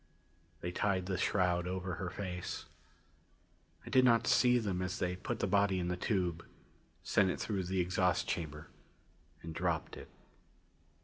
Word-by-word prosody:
They 85 - -3
tied 95 -1 0
the 95 0 -1
shroud 90 -1 +1
over 90 0 -3
her 90 - -2
face. 90 -2 -5 1.2
I - - -7
did 130 - +6
not 115 -1 +5
see 125 -1 +5
them 100 -6 -1
as 90 0 -2
they 90 0 -1
put 90 - -4
the - - 0
body 100 -1 +3
in 90 -1 -1
the 90 - 0
tube, 90 -3 -1 0.6
sent 100 -2 +3
it - - -2
through 100 -4 -2
the 95 +1 0
exhaust 90 0 +1
chamber 75 -2 -3 0.8
and 80 0 -6
dropped 85 -1 -1
it. - - -10
90 Hz, 160 wpm, -34 LUFS, 90-100 Hz, 1.2 s, did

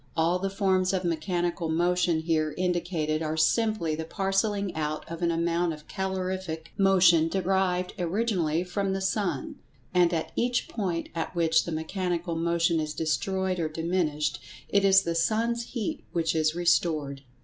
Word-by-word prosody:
All 170 +3 +2
the 195 +1 -1
forms 190 -1 +1
of 190 -1 0
mechanical 175 0 -1
motion 175 0 +2
here 155 -2 0
indicated 175 -4 -1
are 155 0 -2
simply 215 0 +2
the 160 +1 -3
parcelling 195 +2 -1
out 155 -1 -3
of 165 +1 -7
an 170 - +2
amount 170 0 0
of 150 -1 -12
calorific 185 -4 -4
motion 180 -4 +5
derived 185 0 0
originally 175 -3 0
from 190 +2 -2
the 195 - -1
sun; 190 -7 -2 0.4
and, 175 -2 +4
at 165 -2 -2
each 245 +1 0
point 180 -7 -3
at 165 +2 -4
which 160 -1 +3
the 170 - -4
mechanical[Pg 170 +1 -2
118] 165 - -2
motion 170 0 +2
is 155 -1 -3
destroyed 185 +4 -1
or 160 -2 -1
diminished, 155 -3 -1 0.3
it 200 0 +3
is 195 0 +6
the 170 - -1
sun's 230 +7 0
heat 265 +6 -4
which 165 -1 +1
is 155 0 +1
restored." 155 -5 +1
175 Hz, 160 wpm, -27 LUFS, 160-190 Hz, 0.4 s, is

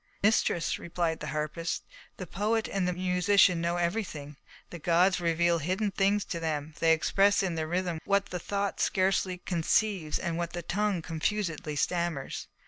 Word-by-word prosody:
"Mistress," 200 -5 +2
replied 170 -1 -2
the 150 - -6
harpist, 155 +3 -3 0.3
"the 185 - -5
poet 215 +6 -1
and 195 -2 -1
the - - +1
musician 180 0 +3
know 170 +1 0
everything; 170 -5 -3 0.4
the 170 - -7
gods 180 +3 +3
reveal 170 0 +2
hidden 185 +6 -1
things 200 +1 +1
to 170 - -4
them; 155 -2 -3
they 165 - +4
express 195 +6 +3
in 185 -3 -1
their 160 -1 -2
rhythm 175 -1 -1
what 200 0 +2
the 180 - -3
thought 200 +3 -2
scarcely 190 -1 +1
conceives 180 0 0
and 170 -2 -3
what 170 -1 -3
the 175 0 -4
tongue 200 -1 -1
confusedly 165 -2 -2
stammers. 170 -2 -2
175 Hz, 160 wpm, -29 LUFS, 165-195 Hz, 0.4 s, they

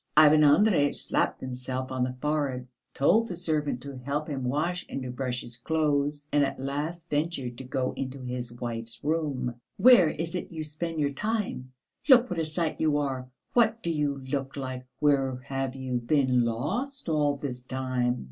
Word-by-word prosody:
Ivan 155 0 +8
Andreyitch 150 0 +5
slapped - - 0
himself 130 0 -4
on 130 -1 0
the 125 0 -3
forehead, 140 -4 -1 0.2
told 220 +11 +3
the 180 - -5
servant 150 -7 -1
to 140 -2 -7
help 145 +4 -2
him 140 -4 -3
wash 160 +8 0
and 135 - -4
to 125 - -4
brush 125 -1 -2
his 120 -1 -7
clothes, 145 0 0
and 145 -1 +4
at 140 - -2
last 150 +5 -3
ventured 145 -5 -1
to - - -6
go 130 0 -1
into 135 0 -4
his 125 -1 -4
wife's 115 -1 -5
room. 145 -6 -1 0.2
"Where 240 -10 +7
is 165 +3 -4
it 180 - -4
you 160 -2 -4
spend 155 +2 -4
your 140 -1 +1
time? 210 - -2 0.4
Look 255 -2 +7
what 175 - -1
a 160 - +1
sight 155 +1 -2
you 155 -2 +3
are! 135 -3 -2 0.2
What 225 -1 +3
do 170 - 0
you 145 -3 0
look 135 0 -3
like? 130 -1 -5
Where 135 -3 +2
have 135 -1 -2
you 130 -2 -2
been 125 -1 +2
lost 200 - -2
all 150 -3 +2
this 130 -3 -5
time? 130 -1 -1
140 Hz, 180 wpm, -28 LUFS, 130-155 Hz, 0.4 s, Ivan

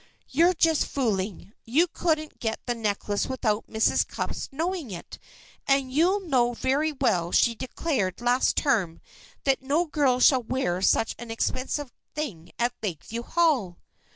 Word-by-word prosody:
"You're 340 +6 +4
just 325 -2 +2
fooling. 210 -6 -2
You 285 +10 +3
couldn't 315 -2 -1
get 225 -1 -2
the 245 - 0
necklace 205 -2 -1
without 225 -5 -1
Mrs. 220 0 +2
Cupp's - - -4
knowing 330 0 -2
it, 175 -4 -8 0.5
and 275 -2 +2
you 370 +7 +2
know 245 -4 +2
very 275 +6 0
well 215 - 0
she 235 - +4
declared 250 - -2
last 245 +2 +2
term 200 - +1 0.4
that 270 -1 +2
no 290 +6 +1
girl 285 -5 +2
should 255 -3 +4
wear 185 -9 0
such 220 +3 +2
an 240 0 -8
expensive 255 +4 -2 0.2
thing 210 - -5
at 240 +1 +1
Lakeview 210 +4 -4
Hall." 255 - +1
255 Hz, 145 wpm, -26 LUFS, 220-295 Hz, 0.5 s, You're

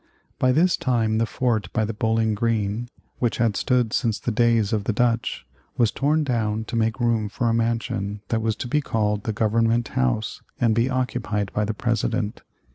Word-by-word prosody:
By 130 - +4
this 170 +7 +3
time 110 -3 +1
the 115 - +1
fort 110 -7 -1
by 110 -2 +1
the 110 - -3
Bowling 110 0 +1
Green, 110 +1 -1 0.3
which 120 -2 0
had 115 -3 +1
stood 125 -2 +1
since 115 -4 +1
the 120 - -2
days 115 -2 +2
of 105 -2 0
the 115 - 0
Dutch, 120 +1 0 0.3
was 115 -3 +3
torn 150 +3 +1
down 110 -5 -1
to 120 - -6
make 115 +2 0
room 115 -3 +1
for 120 +3 -1
a 115 - +2
mansion 115 -3 -1
that 115 -1 0
was 110 -1 0
to - - -5
be 150 +5 +1
called 105 -5 -1
the 110 - 0
Government 115 +2 +1
House 65 - -1 0.2
and 115 -2 +3
be 115 +3 +2
occupied 105 -6 -2
by 105 - +1
the 110 +1 -3
President. 115 -1 -1
115 Hz, 195 wpm, -24 LUFS, 105-120 Hz, 0.3 s, By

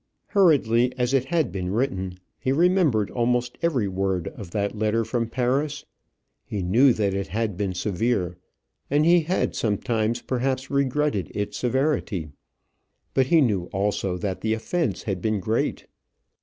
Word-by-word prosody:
Hurriedly 130 - +4
as 125 +1 0
it 135 -2 +2
had 160 -3 0
been 90 -2 -3
written, 95 -6 -1 0.2
he 130 - 0
remembered 160 - +3
almost 125 0 0
every 140 -11 +1
word 95 -2 -1
of 100 -6 -10
that 100 +3 -2
letter 110 +1 +1
from 115 0 -1
Paris. 135 +5 -1 0.6
He 100 -3 -4
knew 120 +10 +5
that 100 -3 0
it 100 0 -2
had 105 +3 -2
been 95 -1 -2
severe, 95 -1 -1 0.5
and 145 +2 +3
he 175 +1 +6
had 170 +3 0
sometimes 115 +1 0
perhaps 130 +1 -2
regretted 140 -5 0
its 105 0 -3
severity. 125 - 0 0.8
But 130 -1 +3
he 165 +2 +5
knew 100 -9 +1
also 95 -1 -1
that 95 0 -3
the 110 0 +1
offence 120 - -2
had 95 -4 -3
been 110 0 0
great. 110 +5 -1
115 Hz, 150 wpm, -24 LUFS, 100-135 Hz, 0.8 s, he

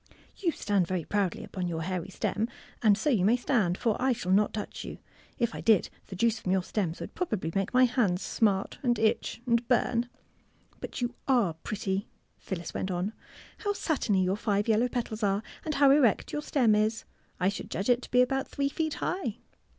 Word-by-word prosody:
'' - - -30
You 340 - +3
stand 200 - 0
very 185 -2 -1
proudly 200 -4 -1
upon 185 -2 -4
your 165 -2 -3
hairy 185 +1 -3
stem. 210 +3 -1 0.3
And 210 -3 +5
so 290 +7 +1
you 210 -8 +2
may 215 +5 +5
stand, 235 -8 +1
for 225 -4 +1
I 260 0 +3
shall 185 -5 -3
not 205 +2 +4
touch 210 -1 -5
you. - - -7 0.4
If 235 -2 0
I - - -5
did, 220 -4 +3 0.2
the 190 - -7
juice 225 +3 +1
from 185 - -2
your 190 -1 +2
stems 180 -4 -2
would - - -7
probably 215 - -2
make 195 0 0
my 255 +1 +5
hands 220 -8 +2
smart 200 -3 0
and 240 -3 +2
itch 220 +2 0
and 235 -1 +1
burn. 240 -1 +2
*^ - - -24 0.7
But - - -6
you 240 0 -1
are 240 -11 +3
pretty," 195 +4 -3 0.3
Phyllis 175 -3 -5
went 190 - -2
on. 180 +2 -1
*^ - - -14 0.5
How 410 -1 -1
satiny 245 - +1
your 185 +2 0
five 205 -1 0
yeUow 230 +2 +2
petals 230 -3 -3
are, 200 0 +1 0.2
and 310 -1 -2
how 280 -1 +6
erect 275 -7 +3
your 295 - -1
stem 250 -7 +3
is! 215 +2 +1 0.4
I 180 +1 +3
should 200 - -6
judge 195 +4 -2
it 245 0 +4
to - - -10
be 250 0 +5
about 270 +1 -1
three 280 0 -1
feet 315 +1 -2
high." 245 - -2
215 Hz, 210 wpm, -29 LUFS, 190-245 Hz, 0.7 s, how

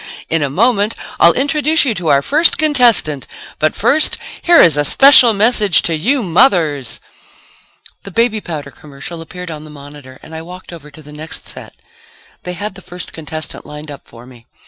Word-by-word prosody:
In 165 -1 +1
a 145 - -1
moment 210 - +1 0.2
I'll 170 - +6
introduce 300 +4 +1
you 245 - 0
to 180 -5 -5
our 140 -2 +3
first 315 +4 +2
contestant. 245 - +1 0.3
But 155 - 0
first 280 +8 +2 0.2
here 345 -1 +4
is 165 -4 +6
a 145 - +2
special 260 - +6
message 210 -3 +2
to 165 - -1
you 240 - -1
mothers 165 - +1 0.5
..." - - -25
The - - -10
baby 220 +2 0
powder 150 -6 -7
commercial 150 +4 -10
appeared 180 +1 -9
on 155 -1 -9
the 155 - -13
monitor 145 -2 -13
and 160 - -13
I 160 - -7
walked 180 +2 -12
over 150 -3 -12
to 155 +2 -15
the 150 +1 -14
next 155 +2 -7
set. - - -10 0.7
They 180 - -5
had 205 +2 -6
the 190 - -14
first 180 -1 -10
contestant 155 -1 -7
lined 150 0 -10
up 140 - -12
for 115 +1 -15
me. 125 -2 -18
170 Hz, 190 wpm, -15 LUFS, 150-225 Hz, 0.7 s, I'll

